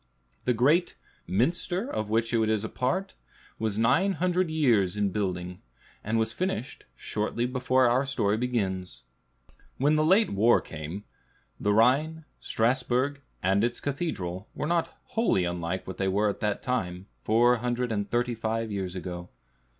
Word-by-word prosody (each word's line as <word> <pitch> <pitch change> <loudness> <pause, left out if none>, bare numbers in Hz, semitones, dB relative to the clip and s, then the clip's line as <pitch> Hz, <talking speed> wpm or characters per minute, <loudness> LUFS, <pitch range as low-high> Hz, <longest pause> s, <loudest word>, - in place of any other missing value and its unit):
The 125 - +3
great 150 +10 +3 0.3
Minster 175 - 0
of 110 - -3
which 115 +2 +1
it 110 -1 +2
is 110 -1 +1
a 110 - -3
part, 165 +10 -1 0.5
was 110 -2 -1
nine 180 - +3
hundred 180 -1 +1
years 115 - +2
in 100 -1 +1
building, 90 -3 -3 0.4
and 110 +2 0
was 110 0 0
finished 185 -1 -3
shortly 110 +3 -2
before 130 0 +2
our 125 +3 +3
story 135 -7 +1
begins. 95 - -2 0.7
When 145 +3 +3
the 155 0 +3
late 190 +7 +4
war 110 +4 +4
came, 80 +6 -7 0.6
the 105 - +1
Rhine, 145 +9 +3
Strasbourg, 130 +4 0 0.2
and 95 +3 +3
its 120 +1 0
Cathedral, 105 - -3
were - - -2
not 170 +1 0 0.2
wholly 225 - +2
unlike 85 +1 -3
what 95 -1 -8
they 95 - +1
were 105 +2 +2
at 100 - -4
that 105 -2 -1
time, 90 -7 -2 0.2
four 120 +3 +4
hundred 120 +1 -1
and 100 -2 -2
thirty 120 0 0
five 115 0 -2
years 95 -2 -3
ago. 90 -1 -6
115 Hz, 155 wpm, -27 LUFS, 100-135 Hz, 0.7 s, late